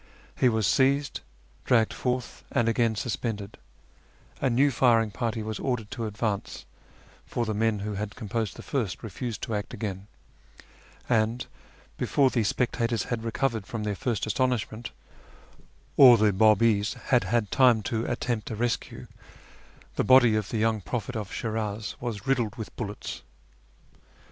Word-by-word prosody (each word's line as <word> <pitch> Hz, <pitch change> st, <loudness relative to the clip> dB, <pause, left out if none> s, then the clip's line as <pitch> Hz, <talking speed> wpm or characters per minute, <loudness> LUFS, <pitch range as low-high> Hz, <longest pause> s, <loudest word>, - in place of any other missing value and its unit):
He 125 Hz, -, +4 dB
was 110 Hz, -2 st, +1 dB
seized, 135 Hz, +6 st, +2 dB, 0.4 s
dragged 115 Hz, -4 st, +3 dB
fortli, 125 Hz, -1 st, -3 dB
and 120 Hz, -, +1 dB
again 115 Hz, -1 st, +2 dB
suspended; 105 Hz, -2 st, -4 dB, 0.8 s
a 135 Hz, -, +2 dB
new 135 Hz, +4 st, +3 dB
firing 115 Hz, -3 st, +3 dB
party 115 Hz, 0 st, -2 dB
was 110 Hz, 0 st, -4 dB
ordered 125 Hz, -5 st, -2 dB
to 115 Hz, -3 st, -3 dB
advance 105 Hz, -1 st, -3 dB, 0.6 s
(for 120 Hz, -, -2 dB
the 110 Hz, -, -2 dB
men 110 Hz, -1 st, +1 dB
who 105 Hz, -, -3 dB
had 105 Hz, +1 st, -4 dB
composed 110 Hz, -2 st, -3 dB
the -, -, -10 dB
first 120 Hz, -10 st, -2 dB
refused 115 Hz, +1 st, -5 dB
to 115 Hz, -, -3 dB
act 105 Hz, -1 st, -3 dB
again); 100 Hz, -2 st, -5 dB, 1.0 s
and 115 Hz, +1 st, +1 dB, 0.5 s
before 135 Hz, -2 st, +3 dB
the 115 Hz, -, +1 dB
spectators 115 Hz, 0 st, 0 dB
had 115 Hz, -1 st, -3 dB
recovered 115 Hz, -2 st, -1 dB
from 115 Hz, -2 st, -4 dB
their 105 Hz, -1 st, -1 dB
first 110 Hz, +2 st, -2 dB
astonishment, 115 Hz, +1 st, -1 dB, 1.1 s
or 125 Hz, -4 st, +9 dB
the 105 Hz, -1 st, +3 dB
Babis 105 Hz, 0 st, +3 dB
had 125 Hz, -6 st, +4 dB
had 105 Hz, +1 st, 0 dB
time 125 Hz, -5 st, +5 dB
to 115 Hz, +1 st, -1 dB
attempt 120 Hz, -2 st, -2 dB
a 110 Hz, -, -4 dB
rescue, 120 Hz, +1 st, -2 dB, 0.9 s
the -, -, +2 dB
body 125 Hz, -4 st, +6 dB
of 105 Hz, -2 st, -1 dB
the 115 Hz, -, -2 dB
young 110 Hz, -1 st, +1 dB
prophet 120 Hz, +5 st, -4 dB
of 105 Hz, -4 st, -4 dB
Shiniz 110 Hz, -2 st, -3 dB
was 120 Hz, -2 st, -4 dB
riddled 125 Hz, -5 st, 0 dB
with 110 Hz, -, -8 dB
bullets. 105 Hz, -3 st, -5 dB
115 Hz, 150 wpm, -27 LUFS, 105-120 Hz, 1.1 s, or